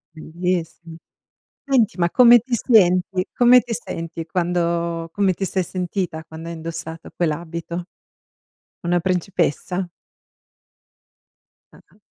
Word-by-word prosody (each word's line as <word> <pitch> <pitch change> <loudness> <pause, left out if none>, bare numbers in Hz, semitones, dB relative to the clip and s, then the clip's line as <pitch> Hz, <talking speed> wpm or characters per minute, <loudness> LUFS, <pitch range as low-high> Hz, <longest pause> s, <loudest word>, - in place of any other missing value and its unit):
Bellissim 170 0 -4 0.7
senti, 245 -8 +2
ma 170 0 +2
come 240 -1 +7
ti 245 +2 -3
senti 185 -5 +3
come 245 +1 +6
ti 240 - -7
senti 165 -7 -5
quando 170 -1 -1
come 200 -2 +2
ti 195 +2 -4
sei 185 +1 -1
sentita 180 -2 -3
quando 160 +1 -9
hai 170 - -5
indossato 165 0 -7
quell'abito? 170 +1 -3 1.0
Una 175 0 +1
principessa? 180 0 -1 1.8
Ah-ah. - - -21
175 Hz, 105 wpm, -21 LUFS, 165-195 Hz, 1.8 s, come